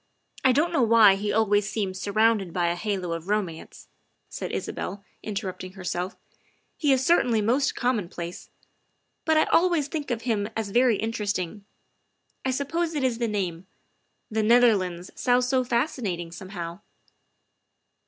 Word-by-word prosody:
I 260 Hz, -, +6 dB
don't 320 Hz, +7 st, +2 dB
know 280 Hz, -, +3 dB
why 225 Hz, -3 st, +7 dB
he 205 Hz, +2 st, -2 dB
always 210 Hz, -1 st, +2 dB
seems 190 Hz, -4 st, -3 dB
surrounded 215 Hz, -2 st, +2 dB
by 175 Hz, 0 st, +1 dB
a 170 Hz, -, -1 dB
halo 185 Hz, -2 st, -2 dB
of 165 Hz, +1 st, -6 dB
romance, 190 Hz, -6 st, -3 dB
' -, -, -45 dB
' -, -, -48 dB
said -, -, -5 dB
Isabel, 200 Hz, +2 st, -4 dB, 0.2 s
interrupting 195 Hz, -3 st, -5 dB
herself, 180 Hz, -1 st, -4 dB, 0.3 s
" -, -, -38 dB, 0.2 s
he 295 Hz, -4 st, +3 dB
is 265 Hz, -1 st, +2 dB
certainly 250 Hz, -9 st, +3 dB
most 250 Hz, +6 st, +1 dB
commonplace, 180 Hz, -8 st, -3 dB, 0.8 s
but 315 Hz, -1 st, +3 dB
I 310 Hz, -, +5 dB
always 340 Hz, -5 st, +2 dB
think 300 Hz, -3 st, -4 dB
of 235 Hz, -2 st, -2 dB
him 215 Hz, -4 st, 0 dB
as 215 Hz, -3 st, -3 dB
very 240 Hz, -1 st, +3 dB
inter 220 Hz, -1 st, -2 dB
esting. 200 Hz, 0 st, -2 dB, 0.8 s
I 265 Hz, -, 0 dB
suppose 315 Hz, +5 st, -1 dB
it 285 Hz, -, -1 dB
is 245 Hz, -3 st, 0 dB
the 235 Hz, -, 0 dB
name 190 Hz, -4 st, -3 dB, 0.6 s
the 220 Hz, 0 st, +1 dB
Netherlands 210 Hz, -6 st, +3 dB
sounds 245 Hz, 0 st, +2 dB
so 260 Hz, 0 st, +2 dB
fascinating, 235 Hz, -, -2 dB
somehow. 175 Hz, -1 st, -7 dB
215 Hz, 155 wpm, -26 LUFS, 185-250 Hz, 0.8 s, why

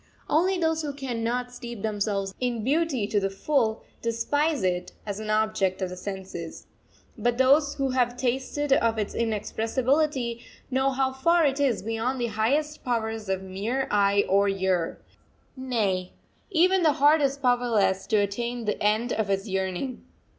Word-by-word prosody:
Only 365 Hz, +5 st, +2 dB
those 320 Hz, -2 st, +1 dB
who 295 Hz, -2 st, -4 dB
cannot 245 Hz, -2 st, -2 dB
steep 240 Hz, -4 st, -8 dB
themselves 205 Hz, -2 st, -1 dB
in 245 Hz, -3 st, -1 dB
beauty 280 Hz, -3 st, +1 dB
to 205 Hz, 0 st, +1 dB
the 195 Hz, 0 st, -1 dB
full, 220 Hz, +2 st, 0 dB, 0.2 s
despise 285 Hz, +5 st, 0 dB
it 180 Hz, -1 st, -1 dB
as 205 Hz, -1 st, -4 dB
an 215 Hz, 0 st, -6 dB
object 215 Hz, -3 st, +1 dB
of 185 Hz, -2 st, -2 dB
the 180 Hz, -, -6 dB
senses. 185 Hz, -3 st, -7 dB, 0.5 s
But 240 Hz, 0 st, +1 dB
those 280 Hz, +3 st, +4 dB
who 270 Hz, -2 st, -1 dB
have 245 Hz, -1 st, +1 dB
tasted 265 Hz, +3 st, 0 dB
of 230 Hz, -4 st, +2 dB
its 210 Hz, -2 st, -2 dB
inexpressibility 235 Hz, +4 st, 0 dB, 0.3 s
know 265 Hz, +1 st, +2 dB
how 265 Hz, 0 st, 0 dB
far 335 Hz, +5 st, +3 dB
it 275 Hz, 0 st, +1 dB
is 265 Hz, -6 st, +1 dB
beyond 225 Hz, +4 st, -2 dB
the 240 Hz, -, 0 dB
highest 290 Hz, +8 st, 0 dB
powers 225 Hz, -3 st, -2 dB
of 190 Hz, 0 st, -1 dB
mere 210 Hz, +8 st, -2 dB
eye 200 Hz, 0 st, +3 dB
or 200 Hz, +1 st, +3 dB
ear 190 Hz, -3 st, 0 dB, 0.6 s
nay, 215 Hz, -9 st, -1 dB, 0.4 s
even 370 Hz, +3 st, +3 dB
the 310 Hz, -3 st, +4 dB
heart 295 Hz, +3 st, +4 dB
is 275 Hz, -1 st, +1 dB
powerless 240 Hz, -7 st, +1 dB
to 220 Hz, -, +1 dB
attain 235 Hz, +4 st, -1 dB
the 210 Hz, -, -2 dB
end 215 Hz, +4 st, +1 dB
of 215 Hz, -2 st, -1 dB
its 195 Hz, +2 st, 0 dB
yearning. 190 Hz, +6 st, -3 dB
235 Hz, 160 wpm, -26 LUFS, 205-270 Hz, 0.6 s, those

